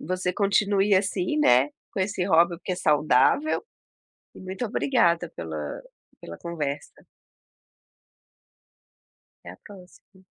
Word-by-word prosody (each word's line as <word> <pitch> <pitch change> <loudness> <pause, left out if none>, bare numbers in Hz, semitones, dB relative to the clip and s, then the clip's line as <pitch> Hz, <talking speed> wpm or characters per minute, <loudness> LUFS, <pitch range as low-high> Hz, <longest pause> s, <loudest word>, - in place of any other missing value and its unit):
você 185 +2 -2
continue 200 +1 +2
assim, 190 +5 0
né, 130 - +4 0.2
com 195 - -3
esse 190 -1 -1
hobby 170 -1 +3
porque 185 +2 -5
é - - -3
saudável, 150 - +2 0.7
e - - -13
muito 190 +5 -5
obrigada 180 - +1
pela 80 -3 -6 0.4
pela 85 0 -9
conversa. 150 -4 -6 2.4
Até 85 - -8
a - - -34
próxima. 190 -1 -17
180 Hz, 110 wpm, -25 LUFS, 150-195 Hz, 2.4 s, né